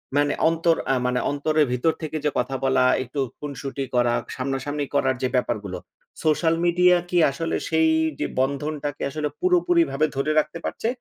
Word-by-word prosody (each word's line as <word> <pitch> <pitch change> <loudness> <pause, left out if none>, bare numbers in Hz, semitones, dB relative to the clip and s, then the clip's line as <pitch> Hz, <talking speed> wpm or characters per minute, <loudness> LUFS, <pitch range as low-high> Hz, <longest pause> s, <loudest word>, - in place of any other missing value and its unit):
মানে 145 0 +2 0.2
অন্তর 165 0 +2 0.2
আ - - +2
মানে 125 0 +1
অন্তরের 150 +1 +1
ভিতর 140 +6 +1
থেকে 155 0 -3
যে - - +4
কথা 130 +2 -2
বলা, 135 -1 +3 0.2
একটু 130 +4 -6 0.2
খুনসুটি 140 -1 -5
করা 120 -1 +3 0.2
সামনাসামনি 135 +2 -3
করার 130 -2 +2
যে 130 - +1
ব্যাপারগুলো, 105 -7 -1 0.5
সোশ্যাল 160 +1 +2
মিডিয়া 180 +1 +5
কি 180 - 0
আসলে 165 +4 -3
সেই 160 0 +3 0.3
যে - - 0
বন্ধনটাকে 145 +2 -2
আসলে 150 +1 -2
পুরোপুরি 355 -1 +3
ভাবে 150 +3 +2
ধরে 140 +3 0
রাখতে 155 +2 -3
পারছে - - -3
145 Hz, 165 wpm, -23 LUFS, 135-160 Hz, 0.5 s, মিডিয়া